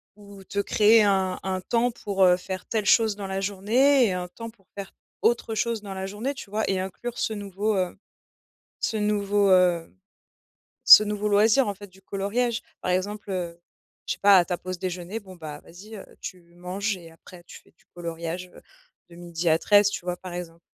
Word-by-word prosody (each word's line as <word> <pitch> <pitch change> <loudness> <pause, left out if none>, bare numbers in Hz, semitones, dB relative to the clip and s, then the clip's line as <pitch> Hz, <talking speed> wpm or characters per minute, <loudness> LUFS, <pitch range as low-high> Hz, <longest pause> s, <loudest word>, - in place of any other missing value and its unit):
Ou 200 -1 -14
te 200 - -10
créer 215 +2 +5
un 190 -2 +1
un 190 -1 -2
temps 235 +5 +1
pour, 200 -4 -1
heu, 180 0 +5
faire 185 0 -6
telle 220 -2 -1
chose 220 -1 +4
dans 200 -2 -5
la 190 0 -3
journée 235 +8 +3
et 195 - 0
un 180 0 -4
temps 230 +5 -8
pour 215 -4 -23
faire 200 -1 -7 0.3
autre 235 -1 +1
chose 230 0 -1
dans 200 -2 -7
la 190 0 -5
journée, 215 +8 -4
tu 275 -7 -10
vois 215 +2 -1
et 190 -1 0
inclure 195 +6 -6
ce 220 - -1
nouveau, 205 +1 -2
heu, 185 -1 -1 0.8
ce 225 - -1
nouveau, 205 -1 +1
heu, 180 -3 +3 0.9
ce - - +11
nouveau 210 0 -2
loisir, 215 +5 +4
en 205 - -1
fait, 205 +1 -12
du 190 0 -21
coloriage, 220 +5 -2 0.2
par 180 - -1
exemple, 205 +3 -2
heu, 175 -2 -4 0.5
je - - -1
sais - - -13
pas, 200 -1 +7
à 175 - +4
ta 180 - -2
pause 185 +1 -6
déjeuner, 180 +3 -4
bon, 190 -3 -13
bah, 155 -3 -8
vas-y, 205 +6 -12
heu, - - -10 0.2
tu 180 -2 -7
manges 190 +4 -3
et 170 -3 -13
après 175 +2 -15
tu - - -13
fais - - -26
du - - -29
coloriage, 170 +1 -5
heu, - - -15 0.5
de 170 - -14
12:00 170 -1 -3
à 160 - +4
13:00, 205 +2 +5
tu 200 -3 -6
vois, 180 -1 -2
par 185 0 -9
exemple. 170 -1 -7
195 Hz, 210 wpm, -25 LUFS, 180-210 Hz, 0.9 s, ce